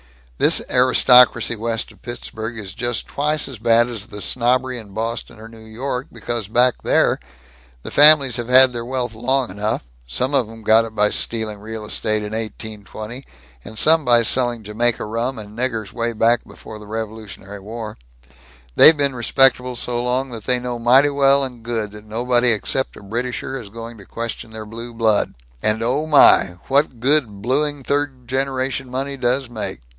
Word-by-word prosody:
"This - - +4
aristocracy 125 -2 +5
west 115 +1 -3
of - - -21
Pittsburgh 120 -2 -7
is 100 -3 -7
just 120 -2 -3
twice 150 +1 -1
as 130 -5 -9
bad 115 +1 +3
as 110 -4 -6
the 105 - -9
snobbery 125 +3 0
in 105 -3 -12
Boston 115 0 -4
or 110 - -10
New 115 -1 -14
York, 125 +4 -5
because 115 -1 -5
back 120 +3 +2
there, - - +2 0.6
the - - -8
families 145 -4 +6
have 120 -1 -4
had 130 0 +7
their 120 -1 -4
wealth 125 -1 -3
long 125 +2 -1
enough 105 - -2 0.2
some 125 - -1
of 130 -6 +1
'em 115 0 -12
got 110 +1 +4
it 110 -1 -10
by 105 0 +3
stealing 110 -2 -3
real 110 +1 -7
estate 110 0 -1
in 105 +1 -6
1820, 110 +2 -7 0.4
and 110 - -11
some 160 +6 +5
by 120 -2 +4
selling 120 -1 +1
Jamaica 115 +3 0
rum 115 +4 -3
and 105 -1 -10
niggers 115 -4 -2
way 115 0 -2
back 115 +2 +2
before 110 -1 -11
the 105 - -12
Revolutionary 105 -2 -7
War 110 +2 -8 0.8
they've 160 0 +8
been 140 -2 0
respectable 125 +1 +2
so 120 0 -2
long 130 +2 -1
that 115 -3 -8
they 125 - +3
know 125 -1 -5
mighty 130 +5 +4
well 140 0 +3
and 125 -3 -6
good 115 -3 -4
that 105 0 -12
nobody 120 +3 +1
except 130 +4 -1
a - - -13
Britisher 125 +5 -4
is 105 - -12
going 115 +1 -9
to 100 - -13
question 115 0 -6
their 110 -1 -8
blue 115 +2 -9
blood 110 -2 +1 0.3
and 110 +1 0
oh 135 +6 -1
my, 95 - +5
what 135 -3 0
good 120 -6 0
blueing 145 +3 -1
third 135 -3 -2
generation 135 0 -2
money 135 +2 -3
does 130 +1 0
make. 110 - -5
120 Hz, 180 wpm, -20 LUFS, 110-130 Hz, 0.8 s, they've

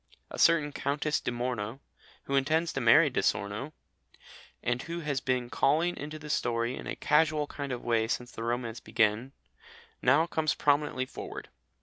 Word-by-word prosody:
A - - -7
certain 155 -3 +4
Countess 145 +2 -1
di - - -3
Morno, 120 -1 -3 0.4
who 140 - -5
intends 160 +5 +1
to 135 - -2
marry 115 -1 +6
Di - - 0
Sorno, 100 +9 -1 0.9
and 120 +1 0
who 170 0 -5
has 145 -4 -2
been 130 -2 0
calling 165 +5 +2
into 150 +2 -6
the 150 0 -10
story 120 -3 0
in - - -8
a - - -3
casual 150 0 +2
kind 140 -1 -6
of 125 - -4
way 115 -2 +1
since 120 +1 -3
the - - -8
romance 120 0 -2
began, 110 +5 +1 0.7
now 140 +6 +4
comes 160 -3 0
prominently 145 -3 +1
forward. - - -8
135 Hz, 165 wpm, -29 LUFS, 120-150 Hz, 0.9 s, marry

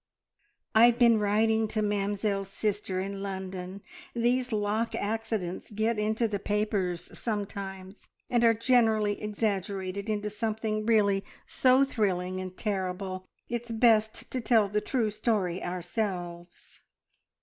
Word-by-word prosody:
"I've 235 +2 +6
been 235 -3 +5
writing 220 +2 +2
to 215 0 -1
Mamzelle's 200 -1 -1
sister 200 -2 -2
in 195 +1 -4
London. 190 -1 -5 0.3
These 245 +2 +1
lock 215 +2 0
accidents 215 -4 -3
get 220 +1 0
into 220 +2 +1
the 205 -2 -2
papers 200 -4 -1
sometimes, 200 -3 -5 0.2
and 240 -1 +2
are 230 -1 +5
generally 220 -3 +2
exaggerated 200 -2 -2
into 210 0 -1
something 215 0 -2
really 200 -3 +3 0.2
so 260 +1 +4
thrilling 185 -7 -1
and 185 0 -7
terrible. 185 -2 -3 0.2
It's 240 0 -4
best 220 -1 +2
to 255 - -2
tell 225 -3 +4
the 210 +1 0
true 230 -4 0
story 205 -5 -1
ourselves." 175 -1 -5
210 Hz, 120 wpm, -29 LUFS, 195-225 Hz, 0.3 s, I've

